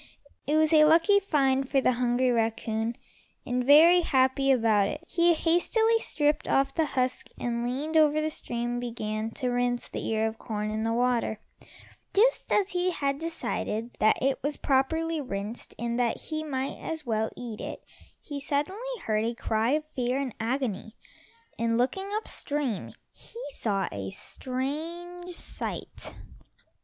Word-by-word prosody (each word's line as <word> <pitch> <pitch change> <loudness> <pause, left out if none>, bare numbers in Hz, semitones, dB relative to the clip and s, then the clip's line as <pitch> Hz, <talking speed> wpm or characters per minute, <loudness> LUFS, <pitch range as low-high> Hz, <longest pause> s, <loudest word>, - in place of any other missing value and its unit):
It 295 - +2
was 315 0 +3
a 305 -1 +8
lucky 330 +6 +5
find 270 -8 +1
for 275 - +3
the 260 - +3
hungry 250 +1 +1
raccoon, 225 0 0 0.5
and, 250 0 0
very 320 +6 +7
happy 270 -3 +2
about 220 -5 +3
it, 300 - -5
he 340 0 +3
hastily 445 +8 +2
stripped 295 -7 0
off 270 0 +2
the 320 -2 +1
husk 255 0 0
and 235 -1 -2
leaning 275 +6 -2
over 305 -1 +5
the 310 0 -1
stream 240 -3 -3
began 220 -2 -3
to 255 -3 -1
rinse 245 0 0
the - - -5
ear 220 0 +1
of 220 0 -3
corn 210 -2 -3
in 215 0 -2
the 225 +1 0
water. 240 -2 +1 0.8
Just 480 +5 +3
as 400 -2 +3
he 360 0 0
had 280 -5 -1
decided 245 -8 -3
that 215 - +4
it 270 0 +1
was 290 +2 -2
properly 320 +4 +1
rinsed, 210 -2 -6
and 235 0 -2
that 235 -2 +1
he 310 -1 -3
might 270 -3 -3
as 320 -2 -5
well 220 -2 0
eat 235 -3 -6
it, - - -6 0.4
he 290 -2 -6
suddenly 370 - -2
heard 215 -1 +1
a 230 +1 -1
cry 225 +3 0
of 305 0 0
fear 250 0 0
and 265 -4 -3
agony, 225 -3 -2 0.6
and 230 0 +1
looking 385 +11 0
up 435 - -3
stream, 285 -8 -2 0.2
he 465 - -11
saw 200 -7 -1
a 100 -1 -5
strange 335 - -5
sight. - - -5
260 Hz, 160 wpm, -28 LUFS, 230-310 Hz, 0.8 s, a